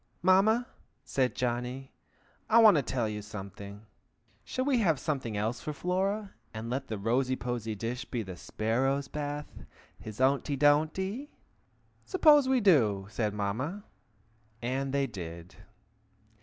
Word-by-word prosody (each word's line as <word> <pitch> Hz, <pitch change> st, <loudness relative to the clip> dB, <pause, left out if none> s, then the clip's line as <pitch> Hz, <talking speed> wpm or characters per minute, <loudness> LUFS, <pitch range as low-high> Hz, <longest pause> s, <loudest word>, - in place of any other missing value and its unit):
"Mamma!" 205 Hz, +6 st, +4 dB, 0.4 s
said 130 Hz, -1 st, 0 dB
Johnny. 125 Hz, +2 st, -3 dB, 0.6 s
"I 220 Hz, -, +5 dB
want 220 Hz, -5 st, +8 dB
to 150 Hz, -, +3 dB
tell 125 Hz, -3 st, -1 dB
you 105 Hz, -1 st, -4 dB
something. 100 Hz, 0 st, -9 dB, 0.6 s
Shall 255 Hz, -, -3 dB
we 275 Hz, -4 st, +2 dB
have 165 Hz, -, +2 dB
something 130 Hz, -9 st, -2 dB
else 110 Hz, +3 st, -2 dB
for 150 Hz, -, -4 dB
Flora, 195 Hz, +5 st, -1 dB, 0.2 s
and 115 Hz, +2 st, -5 dB
let 135 Hz, +1 st, -2 dB
the 110 Hz, -, -4 dB
rosy 125 Hz, +5 st, +1 dB
posy 120 Hz, -4 st, -3 dB
dish 115 Hz, +4 st, -4 dB
be 120 Hz, -3 st, -3 dB
the 95 Hz, -2 st, -8 dB
sparrow's 135 Hz, +9 st, -1 dB
bath, 145 Hz, 0 st, -5 dB, 0.4 s
his 110 Hz, 0 st, -9 dB
ownty 140 Hz, +2 st, +2 dB
donty?" 160 Hz, -, +2 dB, 0.7 s
"Suppose 300 Hz, -8 st, +5 dB
we 265 Hz, -1 st, +4 dB
do!" 115 Hz, -, +4 dB
said 105 Hz, -2 st, -1 dB
Mamma. 130 Hz, -, -3 dB, 0.8 s
And 130 Hz, +3 st, -2 dB
they 140 Hz, 0 st, +1 dB
did. 85 Hz, -6 st, -8 dB
130 Hz, 135 wpm, -30 LUFS, 110-175 Hz, 0.8 s, want